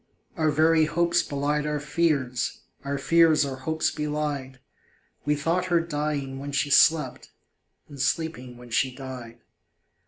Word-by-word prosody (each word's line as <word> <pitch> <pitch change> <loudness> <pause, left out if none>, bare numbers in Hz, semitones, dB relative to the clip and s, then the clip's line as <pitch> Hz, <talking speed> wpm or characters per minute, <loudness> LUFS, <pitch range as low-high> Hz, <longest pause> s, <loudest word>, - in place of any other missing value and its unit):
Our 155 -1 +1
very 160 +1 +4
hopes 170 +2 +2
belied 145 +1 -1
our 150 0 -1
fears, 145 -5 -1 0.2
Our 140 0 -2
fears 160 +1 +4
our 135 -1 -5
hopes 160 +4 -1
belied 150 -3 -3 0.7
We 150 0 +2
thought 165 +5 0
her 175 -2 +2
dying 150 -4 -3
when 140 +1 -6
she 140 +1 0
slept, 160 +2 +3 0.6
And 140 -3 -8
sleeping 130 -5 -2
when 120 -1 -13
she 130 +2 +1
died. 125 -4 -9
150 Hz, 135 wpm, -26 LUFS, 135-160 Hz, 0.7 s, very